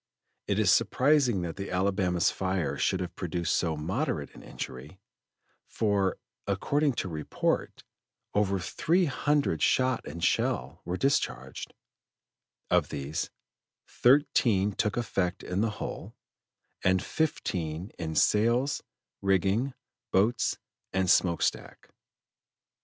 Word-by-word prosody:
It - - +1
is - - +4
surprising 130 -8 +3
that 85 0 -5
the 100 0 -5
Alabama's 90 -2 +1
fire 95 -3 -1
should 95 - 0
have 90 - -5
produced 85 -1 -1
so 80 -3 0
moderate 85 - -2
an - - -12
injury, 70 +9 -8 0.7
for, 100 -3 +1 0.3
according 145 -1 +1
to 105 - -3
report, 80 -4 -2 0.5
over 100 -1 +2
three 170 - +1
hundred 145 - +1
shot 130 +3 +2
and 85 +3 -6
shell 65 +6 0
were 90 +1 -2
discharged; 135 +5 -1 1.0
of - - +3
these, 70 +2 -3 0.6
thirteen 120 -7 +3
took 105 +2 -1
effect 95 -6 -1
in 90 +2 -1
the 115 - +2
hull, 105 - -6 0.7
and 95 0 +3
fifteen 90 - -2
in 80 -2 -3
sails, 120 +6 +3 0.4
rigging, 100 +7 +1 0.4
boats, 110 +4 +2 0.3
and 95 -2 +2
smoke 85 -2 +3
stack. - - -3
95 Hz, 115 wpm, -29 LUFS, 85-120 Hz, 1.0 s, is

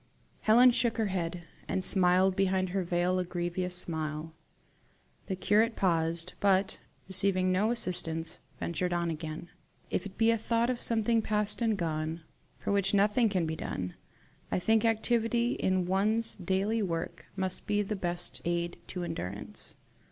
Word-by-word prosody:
Helen 245 +4 +6
shook 235 -1 +2
her 220 -3 0
head, 175 -1 -3 0.2
and 190 -1 -1
smiled 185 0 +4
behind 190 -1 +1
her 190 +1 -1
veil 175 +1 0
a - - +1
grievous 180 +1 -2
smile. 160 -2 -2 0.9
The 190 - -2
curate 215 +5 +2
paused, 165 -1 0
but, 195 -1 +2 0.3
receiving 185 -1 +2
no 200 +4 +2
assistance, 165 -8 0 0.2
ventured 175 +2 -2
on 170 -1 0
again. 160 +1 -6 0.4
"If 195 - -1
it 195 - -14
be 225 0 +4
a 230 - +1
thought 230 +2 +1
of 245 - -4
something 230 0 +3
past 210 0 -1
and 225 -3 +1
gone, 160 -1 -2 0.4
for - - -3
which 200 0 +2
nothing 210 +3 +3
can 185 -4 0
be 160 0 -2
done, 90 - -4 0.6
I - - +1
think 220 +4 +2
activity 235 +1 +1
in 185 -1 0
one's 215 +5 +2
daily 195 +4 0
work 165 -4 -4
must 190 -1 -3
be 205 0 +1
the 210 +1 -3
best 175 -2 -1
aid 170 0 -2
to 180 -1 -5
endurance." 90 - -5
185 Hz, 155 wpm, -30 LUFS, 175-215 Hz, 0.9 s, Helen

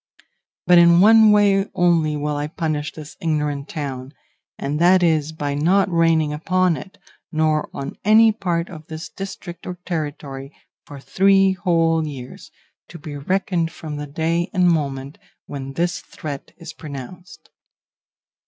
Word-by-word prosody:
But 180 0 +6
in 170 0 +6
one 220 +2 +7
way 200 -1 +3
only 165 -4 +2
will 150 0 -2
I 145 0 -2
punish 155 -1 -3
this 150 -2 -11
ignorant 150 -3 -2
town, 135 -3 -5 0.4
and 145 +2 -3
that 180 +2 +5
is 160 -2 +2
by 145 -2 -3
not 180 +7 +2
raining 165 -3 +2
upon 180 +3 +1
it, 190 - -10 0.3
nor 155 -1 +1
on 140 - -6
any 220 +2 +6
part 175 -5 -2
of 160 -3 -12
its 160 +2 -6
district 185 -3 -8
or 180 - -4
territory, 145 -4 -5 0.3
for 145 - -10
three 195 +5 +3
whole 165 -3 +1
years, 130 -4 -9 0.4
to 170 - -11
be 150 -2 -8
reckoned 170 +2 -1
from 150 -2 -7
the 145 0 -5
day 165 +3 -1
and 180 -1 +4
moment 140 -4 -1 0.3
when 135 -1 -7
this 170 +3 -1
threat 145 -3 -8
is 165 -2 -9
pronounced. 155 +5 -10
160 Hz, 145 wpm, -21 LUFS, 150-180 Hz, 0.4 s, one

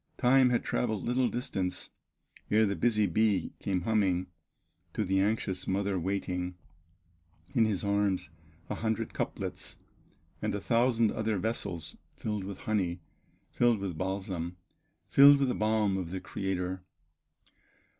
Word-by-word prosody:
Time 130 0 +5
had 120 - +1
traveled 110 -4 -1
little 125 +1 +1
distance, 95 -7 -3 0.6
Ere 110 +1 +4
the 100 -1 0
busy 110 -2 +2
bee 105 +2 +1
came 95 -3 -1
humming 95 -3 +1 0.7
To - - 0
the 95 +1 +1
anxious 100 -2 0
mother 95 0 0
waiting, 90 -1 -2 1.0
In 115 - +4
his 105 -3 -1
arms 100 -4 0 0.4
a - - -3
hundred 110 0 -2
cuplets, - - -4 0.6
And - - -1
a - - -2
thousand 115 0 +2
other 110 -1 -1
vessels, 90 -6 -3 0.2
Filled 105 -3 -3
with 100 -1 -7
honey, 95 -5 -1 0.5
filled 120 -2 +3
with 95 -4 -4
balsam, 95 -1 -3 0.5
Filled 140 +1 +8
with 135 -2 +1
the - - +1
balm 110 -2 +1
of 90 -3 -3
the 95 +2 -4
Creator. 95 -1 -3
100 Hz, 135 wpm, -30 LUFS, 95-110 Hz, 1.0 s, Filled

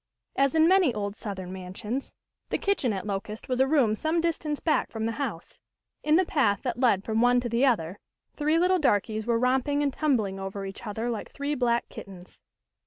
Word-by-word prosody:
As 275 +2 +2
in 320 0 +5
many 370 -6 +5
old 205 -1 -3
Southern 190 -5 -6
mansions, 195 +8 -5 0.4
the - - 0
kitchen 395 - 0
at 195 -1 -4
Locust 210 +1 -5
was 255 -1 -1
a 265 - +4
room 265 -7 +3
some 315 +9 0
distance 320 -3 -1
back 315 - +1
from 220 -1 -4
the 230 - 0
house. 230 - -5 0.4
In 305 0 +3
the 370 +2 +4
path 215 - +1
that 245 -2 -2
led 230 -7 +3
from 220 +1 0
one 245 0 +5
to 245 -1 -3
the 235 +4 +3
other, 190 -6 0 0.4
three 305 +2 +1
little 365 +2 +3
darkies 220 - +1
were 235 -1 +2
romping 265 +4 +1
and 280 -2 0
tumbling 225 -11 0
over 195 +1 -5
each 195 +4 -8
other 225 +3 -2
like 225 - -5
three 285 +1 -3
black 240 -3 +1
kittens. 185 -2 -11
240 Hz, 200 wpm, -27 LUFS, 205-290 Hz, 0.4 s, in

